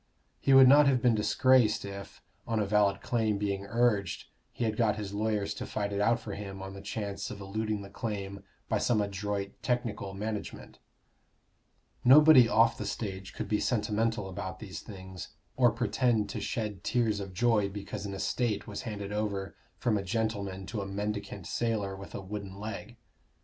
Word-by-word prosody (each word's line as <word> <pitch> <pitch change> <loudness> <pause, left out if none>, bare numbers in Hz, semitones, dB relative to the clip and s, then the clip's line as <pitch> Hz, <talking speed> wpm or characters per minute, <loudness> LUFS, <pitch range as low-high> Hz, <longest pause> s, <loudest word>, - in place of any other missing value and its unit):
He 135 - +1
would 135 -1 +9
not 145 +2 +7
have 130 -2 +4
been 120 -1 +4
disgraced 110 +2 +3
if, 100 0 -9 0.2
on 115 -1 0
a 105 - +1
valid 100 -1 +2
claim 110 -4 0
being 100 -1 -2
urged, 115 -5 +1 0.3
he - - -4
had 110 -1 0
got 110 -2 +2
his 105 -2 -5
lawyers 105 -1 0
to - - -6
fight 100 -1 -2
it 100 - 0
out 115 +3 +3
for 110 -3 -7
him 100 -1 -6
on 95 0 -7
the 95 - -9
chance 100 -1 -4
of 100 - -7
eluding 105 +1 -3
the 100 - -10
claim 100 -2 -4 0.3
by - - +1
some 115 -3 +2
adroit 100 0 -2
technical 115 -6 -2
management. 105 +1 -5 1.2
Nobody 135 -2 +8
off 115 +1 +4
the 105 - -3
stage 95 -3 -5
could - - -4
be 105 - +1
sentimental 110 -2 0
about 95 -1 -5
these 95 -2 -7
things, 95 -4 -9 0.2
or 125 -2 +5
pretend 115 -2 +1
to - - -4
shed 105 -5 -3
tears 115 -4 +1
of 95 -2 -7
joy 110 -2 +3
because 100 0 -6
an 100 - -5
estate 115 +2 -1
was 105 -2 -6
handed 100 -2 -5
over 100 -2 -2 0.2
from 110 -5 +1
a - - -4
gentleman 100 -2 -2
to 105 +2 -4
a 100 - -5
mendicant 100 -1 -4
sailor 110 -5 -1
with 95 -3 -10
a - - -4
wooden 100 0 -6
leg. 110 +3 -6
105 Hz, 180 wpm, -30 LUFS, 100-115 Hz, 1.2 s, would